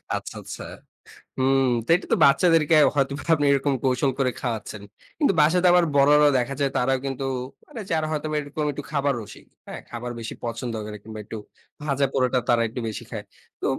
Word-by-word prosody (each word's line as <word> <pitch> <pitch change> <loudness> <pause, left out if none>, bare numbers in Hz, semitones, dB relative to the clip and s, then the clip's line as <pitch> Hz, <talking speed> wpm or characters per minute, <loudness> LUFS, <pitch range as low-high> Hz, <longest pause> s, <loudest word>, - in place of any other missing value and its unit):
আচ্ছা, - - -6
আচ্ছা। - - -8 0.7
হুম, 135 +1 +3 0.2
তো - - -23
এটা 180 - -3
তো - - +3
বাচ্চাদেরকে 160 +2 +4 0.2
হয়তোবা 140 0 0
আপনি 145 - 0
এরকম 140 0 +2
কৌশল 130 +1 +2
করে 130 -2 +2
খাওয়াচ্ছেন। 110 -4 -4 0.4
কিন্তু 290 -10 +3
বাসাতে 175 +4 +4
আবার 175 -1 +5
বড়রাও 145 +1 +6
দেখা 125 +2 -1
যায় 140 -1 +1
তারাও 130 +2 +2
কিন্তু 135 0 -3 0.4
আরে 225 - -7
যারা 160 -1 +1
হয়তোবা 155 0 -2
এরকম 150 +1 -4
একটু 145 - -6
খাবার 140 -1 +1
রসিক। 105 - -12 0.2
হ্যাঁ? - - -7
খাবার 120 +1 -5
বেশি 115 - -6
পছন্দ 115 0 -4
করে 105 0 -7
কিংবা 110 0 -8
একটু 110 - -7 0.5
ভাজা 140 -2 +1
পোড়াটা 130 -1 +2
তারা 120 -1 +4
একটু 120 - -6
বেশি 110 - -6
খায়। - - -5 0.4
তো - - -2
140 Hz, 185 wpm, -24 LUFS, 125-150 Hz, 0.7 s, বড়রাও